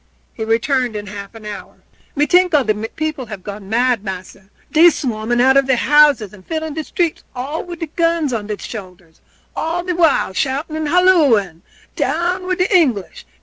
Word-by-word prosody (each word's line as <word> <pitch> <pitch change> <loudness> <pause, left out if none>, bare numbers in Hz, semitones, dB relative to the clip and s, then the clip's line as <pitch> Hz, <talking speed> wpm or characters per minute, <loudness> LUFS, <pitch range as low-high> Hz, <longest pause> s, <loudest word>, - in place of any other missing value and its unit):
He 220 - -5
returned 235 +2 0
in 205 0 -5
half 200 +1 -9
an 220 -1 -11
hour. 210 -1 -8 0.4
"Me 295 +1 +2
tink 360 0 +3
all 285 - +4
de 215 - +1 0.2
people 310 -5 -3
gone 200 -1 -8
mad, 240 -1 +1
massa. 190 0 -8 0.2
Dey 330 +2 +7
swarming 240 -5 -2
out 265 +2 +5
of 275 -1 +3
deir 265 - +3
houses 280 -6 +4
and 190 -3 -14
filling 315 - -4
de 315 +1 -4
streets, 340 +1 -2
all 275 +6 -4
wid 345 -2 -6
guns 330 -5 +1
on 210 -3 -3
deir 210 -1 -3
shoulders, 180 -7 -10 0.3
all 335 +2 -2
de 360 0 -2
while 325 - +2
shouting 275 - -2
and 315 -1 -2
halloing 285 - +3 0.3
'Down 360 +2 -1
wid 370 -1 0
de 370 +1 +1
English! 255 - +1
265 Hz, 180 wpm, -18 LUFS, 210-320 Hz, 0.4 s, Dey